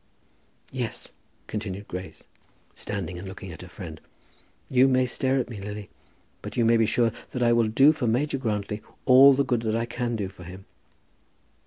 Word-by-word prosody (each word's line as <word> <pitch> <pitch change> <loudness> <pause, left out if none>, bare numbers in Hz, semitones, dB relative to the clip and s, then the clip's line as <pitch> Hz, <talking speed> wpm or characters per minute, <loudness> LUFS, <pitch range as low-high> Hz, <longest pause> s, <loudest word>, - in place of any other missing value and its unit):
"Yes," 125 -4 -4 0.3
continued 100 -2 -5
Grace, 90 +1 -8 0.5
standing 90 -4 -5
and 95 - -8
looking 95 -1 -8
at 80 - -10
her 90 - -9
friend, 85 -4 -9 0.7
"you 130 +1 +5
may 130 -1 +3
stare 130 +2 0
at 130 - 0
me, 110 -4 -8
Lily, 105 0 -7 0.5
but - - -8
you 120 - +3
may 115 +1 +5
be 115 -1 +3
sure 115 0 +2 0.2
that 125 - -2
I 120 0 +4
will 115 -1 +3
do 135 +7 +6
for 150 -6 -2
Major 135 +5 0
Grantly 105 -3 -2 0.2
all 135 +1 +8
the 140 +1 +1
good 120 -3 0
that 110 -1 -1
I 115 0 0
can 120 0 -3
do 100 -3 -2
for 95 -1 -12
him." 95 +2 -10
115 Hz, 185 wpm, -26 LUFS, 100-125 Hz, 0.7 s, all